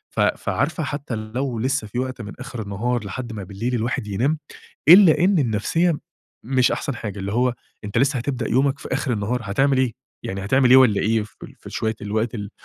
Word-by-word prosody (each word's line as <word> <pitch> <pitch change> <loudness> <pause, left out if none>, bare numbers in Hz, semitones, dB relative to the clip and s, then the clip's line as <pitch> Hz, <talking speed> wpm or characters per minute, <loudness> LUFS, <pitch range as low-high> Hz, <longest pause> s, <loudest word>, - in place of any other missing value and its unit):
ف - - -3
فعارفة 150 +5 0
حتى 145 -4 -4
لو 115 +3 -3
لسه 130 -2 -1
في 120 +4 -4
وقت 130 -1 -3
من 105 -1 -7
آخر 130 -3 -6
النهار 110 +4 -2
لحد 120 +5 -5
ما 105 -3 -6
بالليل 110 +7 -3
الواحد 115 -2 -2
ينام، 125 +10 0 0.5
إلا 175 -3 +9
إن 185 +2 +3
النفسية 145 - +1 0.5
مش 130 +1 +2
أحسن 140 - -3
حاجة، 105 -3 -6
اللي 100 +1 -4
هو 125 +2 +1 0.3
أنت 105 +3 -1
لسه 135 0 +2
هتبدأ 125 -2 -3
يومك 135 +2 +2
في - - -9
آخر 130 - 0
النهار، 110 +4 -1
هتعمل 135 +7 +2
إيه؟ 130 -3 +1 0.3
يعني 95 0 -4
هتعمل 130 +4 +3
إيه 130 - +9
والّا 125 -6 +5
إيه 110 +1 +2
في 105 - -13
ال - - -11
في - - -11
شوية 110 0 -1
الوقت 110 +3 -1
ال 105 -3 -5
120 Hz, 205 wpm, -22 LUFS, 110-135 Hz, 0.5 s, إلا